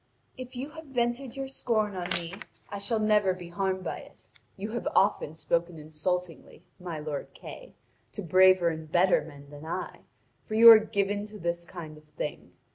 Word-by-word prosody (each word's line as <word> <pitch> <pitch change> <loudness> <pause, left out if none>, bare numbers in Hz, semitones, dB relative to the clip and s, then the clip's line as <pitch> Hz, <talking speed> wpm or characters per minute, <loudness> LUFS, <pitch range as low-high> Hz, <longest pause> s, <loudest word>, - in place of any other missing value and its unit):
If 255 0 -9
you 270 +4 -5
have 320 0 -10
vented 245 0 -1
your 270 0 -3
scorn 215 -6 -1
on 175 -1 -4
me, 170 0 -3 0.4
I 200 - -5
shall 225 +3 -1
never 210 -3 +3
be 175 -2 -10
harmed 190 +1 -1
by - - -4
it. - - -16 0.3
You 205 +3 -5
have 240 - -3
often 190 -6 +2
spoken 170 +1 -1
insultingly, 165 +3 -4 0.2
my 175 -3 -5
lord 150 -2 -5
Kay, - - -11 0.4
to 205 - -5
braver 185 0 +5
and 160 -1 -6
better 180 +2 +4
men 145 -2 -12
than 145 0 -10
I, 170 +3 -5 0.4
for 215 - -5
you 230 +1 +11
are 220 - +10
given 205 -1 -1
to 210 0 -10
this 170 -2 -3
kind 160 -4 -9
of 155 - -24
thing. 150 - -5
185 Hz, 185 wpm, -28 LUFS, 170-215 Hz, 0.4 s, you